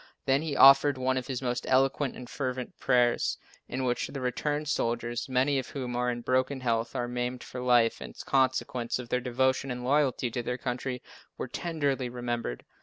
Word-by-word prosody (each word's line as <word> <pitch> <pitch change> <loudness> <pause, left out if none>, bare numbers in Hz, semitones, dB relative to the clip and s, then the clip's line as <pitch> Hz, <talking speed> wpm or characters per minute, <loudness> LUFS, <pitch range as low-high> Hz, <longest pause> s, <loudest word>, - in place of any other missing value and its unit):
Then 135 +1 +3
he 155 -3 -3
offered 140 +1 +7
one 130 0 +1
of 130 -1 -3
his 130 -1 -4
most 125 -1 -2
eloquent 135 +1 +2
and 125 - -9
fervent 130 -1 -4
prayers, 120 -1 +2 0.3
in 130 +1 -2
which 125 -1 0
the 140 - -6
returned 145 +4 -2
soldiers, 120 -2 -1
many 130 +2 +2
of 130 - -5
whom 125 -3 -4
are 125 0 +1
in 120 0 -3
broken 130 +2 0
health 115 -2 -1
or 120 - -1
maimed 125 0 -3
for 125 - -7
life, 120 -2 +3
in - - -8
consequence 130 -2 +1
of 125 -2 -8
their 125 - 0
devotion 130 +2 +1
and 125 -1 -4
loyalty 130 -2 +1
to 120 - -2
their 125 +1 -3
country, 125 0 -4 0.3
were - - -4
tenderly 145 -7 -2
remembered. 120 - -4
125 Hz, 185 wpm, -29 LUFS, 120-135 Hz, 0.3 s, offered